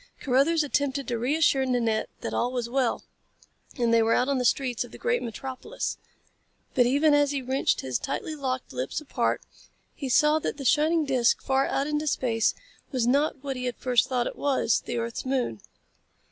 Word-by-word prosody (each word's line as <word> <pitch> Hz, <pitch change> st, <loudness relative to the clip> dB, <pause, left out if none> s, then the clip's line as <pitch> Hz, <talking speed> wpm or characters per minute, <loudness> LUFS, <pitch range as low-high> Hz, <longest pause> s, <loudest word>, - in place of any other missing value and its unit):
Carruthers 285 Hz, +5 st, +2 dB
attempted 280 Hz, -1 st, -1 dB
to 235 Hz, -2 st, -2 dB
reassure 275 Hz, +2 st, +2 dB
Nanette 235 Hz, -4 st, 0 dB
that -, -, -4 dB
all 245 Hz, +1 st, 0 dB
was 245 Hz, -2 st, -2 dB
well, 255 Hz, -1 st, 0 dB, 0.7 s
and 235 Hz, -2 st, +2 dB
they 230 Hz, -, +5 dB
were 225 Hz, +1 st, +3 dB
out 255 Hz, -, +1 dB
on 275 Hz, -2 st, +1 dB
the 250 Hz, -, -1 dB
streets 250 Hz, -1 st, +1 dB
of -, -, -12 dB
the -, -, -10 dB
great 480 Hz, 0 st, 0 dB
metropolis. 260 Hz, -, -5 dB, 0.7 s
But 245 Hz, -2 st, +4 dB
even 290 Hz, +4 st, +3 dB
as 290 Hz, -1 st, +4 dB
he 275 Hz, -2 st, -2 dB
wrenched 260 Hz, +2 st, 0 dB
his 130 Hz, -2 st, -2 dB
tightly 310 Hz, -, -4 dB
locked 260 Hz, -, -3 dB
lips 130 Hz, -, -3 dB
apart 305 Hz, -, -1 dB, 0.5 s
he 275 Hz, -3 st, -5 dB
saw 300 Hz, +4 st, +4 dB
that 300 Hz, -, -3 dB
the 275 Hz, -, -7 dB
shining 310 Hz, +5 st, +3 dB
disc 255 Hz, -4 st, +2 dB
far 270 Hz, 0 st, +2 dB
out 275 Hz, -, 0 dB
into 300 Hz, +1 st, -2 dB
space 230 Hz, -5 st, +1 dB, 0.4 s
was 255 Hz, -4 st, 0 dB
not 280 Hz, +2 st, +1 dB
what 275 Hz, -1 st, -3 dB
he 250 Hz, 0 st, -4 dB
had 245 Hz, -2 st, -3 dB
first 250 Hz, -2 st, +2 dB
thought 250 Hz, -2 st, 0 dB
it -, -, -5 dB
was 275 Hz, -5 st, +1 dB
the -, -, -2 dB
earth's 230 Hz, 0 st, -3 dB
moon. 255 Hz, -, -1 dB
260 Hz, 190 wpm, -26 LUFS, 240-285 Hz, 0.7 s, they